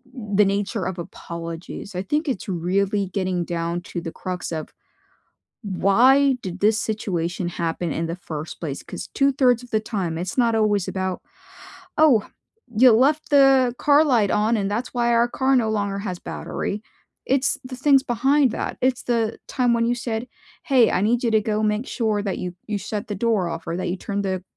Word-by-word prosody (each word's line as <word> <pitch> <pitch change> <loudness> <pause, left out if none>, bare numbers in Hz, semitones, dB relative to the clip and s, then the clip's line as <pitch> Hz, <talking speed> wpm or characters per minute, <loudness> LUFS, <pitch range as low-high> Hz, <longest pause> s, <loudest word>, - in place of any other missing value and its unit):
m 210 -5 -5
the 205 +1 +6
nature 200 +1 -1
of 185 -1 -3
apologies, 170 +3 -7
I 180 - -1
think 300 - -1
it's 250 - -3
really 195 +3 0
getting 185 -2 -1
down 170 0 -2
to 175 - -3
the 165 -1 -5
crux 180 -2 -5
of 155 -1 -4 0.9
why 250 +8 +4
did 185 0 -6
this 215 +1 +3
situation 175 -5 -2
happen 170 -1 -2
in 165 - -2
the 165 - -3
first 155 -3 -7
place? 145 -5 -4
'Cause - - -7
two-thirds 260 -3 +3
of 245 - -14
the 220 - +2
time 190 -7 -3
it's 180 +7 -4
not 235 -2 +3
always 210 -3 +1
about, 190 -1 -3 0.8
"Oh, 280 -9 +4 0.5
you 250 +2 +8
left 285 +7 +2
the 270 -3 +5
car 290 +1 +5
light 240 -9 +2
on 220 +2 +2
and 200 -1 -1
that's 235 +4 -3
why 240 -1 +1
our 235 +1 +4
car 265 +2 +1
no 230 -4 +2
longer 200 -2 -1
has 190 -3 -4
battery." 205 - -4 0.4
It's 265 0 +1
the 255 0 -7
things 275 +1 +4
behind 265 +4 +2
that. - - -4
It's 255 -1 +1
the 230 -2 0
time 245 -3 +1
when 230 0 +2
you 240 - +2
said, 235 0 -4 0.4
"Hey, 255 -5 +4
I - - +1
need 235 +4 +1
you 235 - +2
to 220 -1 +4
go 215 0 -1
make 210 +3 0
sure 220 -3 0
that 195 -2 -2
you 180 -1 -5
you 210 -1 -1
shut 205 +2 -5
the 205 - -3
door 205 -4 +1
off 165 0 -6
or 165 +1 -2
that 185 - -2
you 180 - -2
turned 200 +1 -3
the, 185 -1 -2
210 Hz, 195 wpm, -23 LUFS, 185-245 Hz, 0.9 s, you